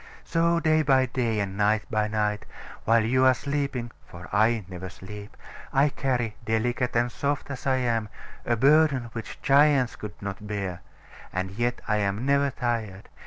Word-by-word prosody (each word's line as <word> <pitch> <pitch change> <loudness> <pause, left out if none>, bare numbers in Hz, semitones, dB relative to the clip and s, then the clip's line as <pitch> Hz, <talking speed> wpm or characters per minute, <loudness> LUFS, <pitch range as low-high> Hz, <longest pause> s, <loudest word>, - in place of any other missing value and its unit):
So 170 0 +2
day 155 -1 +3
by 135 -3 +4
day, 120 -4 -1
and 100 -1 -2
night 105 +1 +2
by 105 -1 +1
night, 105 -1 -1 0.4
while 115 0 +4
you 130 +4 +2
are 130 0 +6
sleeping 140 -2 -3
(for 90 +1 -11
I 110 -2 +3
never 95 0 -7
sleep), 100 +3 -10 0.3
I 140 +2 +4
carry, 125 -6 -1
delicate 120 +3 0
and 120 +1 +2
soft 140 +1 -2
as 135 0 -6
I 135 - +3
am, 115 -4 0 0.3
a 120 - +1
burden 135 -1 +3
which 115 -1 -7
giants 140 -2 +4
could 105 -1 -9
not 100 +1 -6
bear: 100 -4 -4 0.5
and 95 +1 -3
yet 120 +4 -1
I 105 - +2
am 100 +3 -1
never 140 0 +3
tired. 115 -7 -3
120 Hz, 165 wpm, -26 LUFS, 105-135 Hz, 0.5 s, are